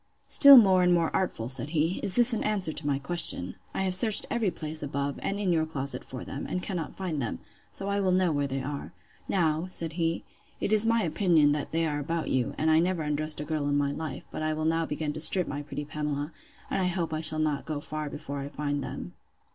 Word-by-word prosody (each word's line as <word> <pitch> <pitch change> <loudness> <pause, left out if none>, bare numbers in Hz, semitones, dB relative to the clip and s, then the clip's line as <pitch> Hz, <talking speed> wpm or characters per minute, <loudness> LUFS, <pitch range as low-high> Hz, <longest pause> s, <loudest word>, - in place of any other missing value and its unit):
—Still 280 -2 +9
more 190 -5 +6
and 180 0 +3
more 165 -2 0
artful! 145 -11 -1
said 135 +3 -1
he—Is 165 +4 0
this 240 0 +6
an 225 - -1
answer 200 -6 +1
to 155 -1 -5
my 140 -1 +1
question?—I 140 - -2
have 185 -1 -1
searched 210 +3 +4
every 230 -4 +1
place 155 -2 -4
above, 140 -1 -3
and 200 - -2
in 190 -4 +1
your 160 -1 +1
closet, 135 -4 -2
for 130 -1 -8
them, 140 - -6
and 180 - -3
cannot 175 -6 -5
find 175 -7 -3
them; 115 - -3 0.3
so 195 - -5
I 200 0 0
will 190 -2 +1
know 180 -2 +2
where 145 -1 0
they 135 0 -4
are. 140 +1 -6 0.3
Now, 160 -2 0
said 165 -3 -3
he, 165 0 -1 0.4
it 210 - 0
is 215 +1 +5
my 230 -1 +2
opinion 165 -3 +3
they 155 +3 -1
are 150 -2 -2
about 165 +3 -3
you; 125 -2 -1
and 160 +1 +2
I 155 - +5
never 175 -1 0
undressed 150 0 0
a - - -5
girl 155 -2 -2
in 145 - +1
my 140 -1 0
life; 160 +2 -6
but - - -5
I 155 0 0
will 155 0 -3
now 165 0 +1
begin 150 0 -3
to 155 - -5
strip 180 +2 +4
my 145 +1 -4
pretty 145 0 -6
Pamela; 150 0 -4 0.4
and - - 0
I - - +1
hope 170 -3 -2
I 155 - -2
shall 155 -1 +3
not 155 -2 -1
go 155 -2 -3
far 150 0 -5
before 140 0 -6
I 140 +1 -5
find 145 -1 -3
them. - - -7
155 Hz, 235 wpm, -27 LUFS, 145-180 Hz, 0.4 s, Still